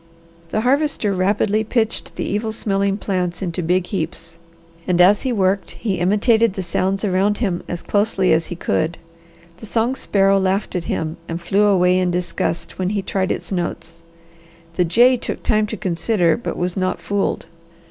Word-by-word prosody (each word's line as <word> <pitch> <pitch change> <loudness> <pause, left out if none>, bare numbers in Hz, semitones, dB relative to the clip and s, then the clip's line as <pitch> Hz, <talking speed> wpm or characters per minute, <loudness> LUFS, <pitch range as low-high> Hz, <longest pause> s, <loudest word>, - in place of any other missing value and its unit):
The 215 - 0
Harvester 265 -4 +1
rapidly 205 +3 +1
pitched 225 0 -2
the - - -3
evil 215 +2 -2
smelling 200 -2 0
plants 180 -3 -2
into 180 0 -3
big 180 +2 +1
heaps 165 -2 -5 0.5
and 180 -1 +1
as 195 +3 +6
he 260 - -1
worked 195 -3 0
he 195 -6 -2
imitated 215 +4 +3
the 190 - -3
sounds 190 +3 -1
around 200 +2 +1
him 190 -7 -1
as 175 - -5
closely 205 -2 +2
as 160 +1 +1
he 175 - -5
could. 165 0 -1 0.6
The 220 - -10
song 230 +4 +1
sparrow 195 -6 +2
laughed 190 +1 -1
at 175 - -2
him 160 0 -3
and 165 0 -4
flew 195 +4 +2
away 185 -2 +3
in 180 -1 +1
disgust 175 -1 -2
when 185 0 0
he 200 -1 -2
tried 190 -1 -1
its - - -4
notes. 170 -2 -4 0.7
The 180 +1 +1
jay 245 +9 +5
took - - -5
time 215 -1 +2
to 220 - -5
consider, 175 -1 +1
but 240 - -5
was 175 0 -2
not 185 -1 -1
fooled. 205 -1 -1
195 Hz, 175 wpm, -20 LUFS, 180-210 Hz, 0.7 s, as